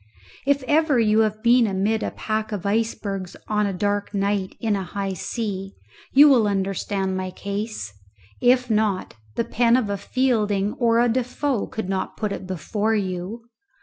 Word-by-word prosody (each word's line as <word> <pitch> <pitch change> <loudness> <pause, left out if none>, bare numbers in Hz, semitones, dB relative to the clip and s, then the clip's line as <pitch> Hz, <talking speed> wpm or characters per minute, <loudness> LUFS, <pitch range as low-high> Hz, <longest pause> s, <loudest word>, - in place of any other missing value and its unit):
If 280 -1 +2
ever 300 0 +3
you 215 -1 +3
have 215 -1 +1
been 240 0 +5
amid 205 +3 0
a - - -1
pack 215 0 -3
of 205 -3 -4
icebergs 200 -3 -2
on 210 -1 +1
a - - -1
dark 205 +2 -1
night 200 -1 0
in 220 -3 +1
a 195 - -2
high 195 +1 -3
sea 195 0 -4 0.4
you 285 +2 +8
will 245 -7 +5
understand 195 -1 -1
my 185 0 -3
case; 200 - -5 0.5
if 250 0 +4
not, 210 -4 0 0.2
the 230 - 0
pen 235 +1 +3
of 220 -5 -1
a 200 - -1
Fielding 210 -3 0
or 230 -2 +3
a 240 - +4
Defoe 250 +1 -1
could 220 -4 -5
not 190 -1 -3
put 210 -2 -2
it 190 - -5
before 205 +5 -1
you. 190 +3 -3
210 Hz, 170 wpm, -23 LUFS, 195-230 Hz, 0.5 s, you